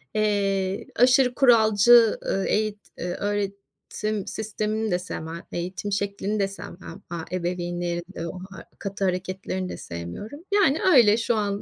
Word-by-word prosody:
Eee, 200 -2 0
aşırı 250 +1 +5
kuralcı, 230 -2 +6
ııı, 195 - 0
eğit 215 -1 0 0.2
ııı, 175 0 -2
öğretim 205 +1 -3
sistemini 215 0 -2
de 180 - +1
sevmem, 170 -2 -6
eğitim 180 +3 -4
şeklini 200 +1 -1
de 195 - +2
sevmem. 195 -1 -9
Aaa, 170 -1 -5
ebeveynlerin 175 -1 -2
de 165 - -4
o 180 - -7
ha 180 -3 -10
katı 200 0 -3
hareketlerini 185 0 -2
de - - -6
sevmiyorum. 85 - -7
Yani, 350 -9 +4 0.2
öyle, 215 -4 +7
şu 235 0 0
an 205 -1 -1
200 Hz, 140 wpm, -25 LUFS, 180-215 Hz, 0.2 s, öyle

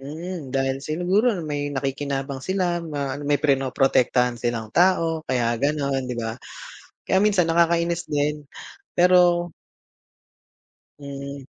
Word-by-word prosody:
Hmm, 155 +1 -7
dahil 135 0 +1
sinuguro 180 +9 +1
na 170 - -5
may 145 0 -2
nakikinabang 135 0 -3
sila, 180 -1 -1
ma 145 -4 -3
ano, 145 - -7
may 145 -1 +3
pinoprotektahan 130 -3 +2
silang 115 -2 -2
tao, 165 -2 +3
kaya 120 -2 +1
gano’n 140 -2 0
‘di - - -2
ba? 115 -1 -3 0.7
Kaya 190 - +3
minsan 200 -5 +3
nakakainis 170 0 +2
din, 145 0 +1 0.6
pero 175 -1 +4 1.5
Mhm. 140 -1 -8
145 Hz, 120 wpm, -23 LUFS, 135-170 Hz, 1.5 s, pero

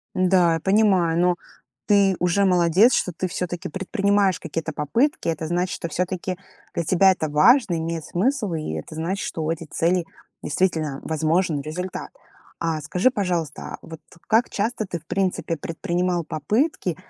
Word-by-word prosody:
Да, 180 -2 +4
я 165 - -2
понимаю, 190 -4 +3
но 180 0 +3 0.5
ты 200 -2 +4
уже 180 +3 +2
молодец, 180 +6 +4
что 180 - 0
ты 185 +3 -3
всё-таки 175 -1 -4
предпринимаешь 195 +2 +1
какие-то 160 0 -4
попытки. 170 - 0
Это 160 -1 -2
значит, 175 +2 -1
что 170 - -5
всё-таки 180 +2 -2 0.4
для 170 - -1
тебя 190 +3 +5
это 160 -4 -3
важно, 175 - +4
имеет 165 -1 -3
смысл, 215 0 0
и 155 - -3
это 80 - -7
значит, 175 +5 -2
что 160 - -4
у 160 - -1
этих 165 -1 -4
целей 170 0 +1 0.4
действительно 155 -4 -1
возможен 160 0 +1
результат. 175 +6 -5 0.5
А 165 -2 -1
скажи, 180 - +2
пожалуйста, 175 - -2
а, - - -6
вот 160 -1 -10 0.3
как 230 +2 +3
часто 220 +2 -1
ты 175 -2 -4
в 155 - -25
принципе 185 -3 -1
предпринимал 175 +2 -2
попытки 185 - -1
175 Hz, 160 wpm, -23 LUFS, 160-190 Hz, 0.5 s, тебя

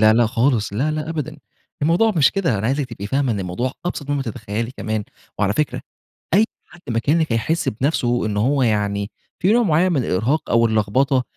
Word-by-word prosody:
لا، 110 - +7
لا، 120 +1 +4
خالص 115 -2 +1
لا، 130 +9 0
لا 155 0 -3
أبدًا 155 -1 -4 0.5
الموضوع 175 +9 +3
مش 145 -4 +5
كده، 170 - 0
أنا 105 - -1
عايزِِك 135 +1 0
تبقي 100 -3 -6
فاهمة 135 +1 +1
إن 100 - -2
الموضوع 95 +8 -2
أبسط 145 -5 -4
مما 145 -1 0
تتخيلي 115 -1 -4
كمان، 110 -1 -2 0.3
وعلى 105 -1 +2
فكرة 150 +7 -1 0.5
أي 210 +4 +5 0.2
حد 175 - -17
مكانِك 145 +6 +1
هيحس 155 +9 0
بنفسه 120 -1 0
إن 105 -1 -2
هو 130 +5 +2
يعني 105 -2 0 0.3
في 190 +5 +3
نوع 240 +1 +4
معيّن 180 -1 +3
من 140 -7 +1
الإرهاق 125 +12 0
أو 115 0 +4
اللخبطة 115 +5 +2
125 Hz, 190 wpm, -21 LUFS, 110-155 Hz, 0.5 s, لا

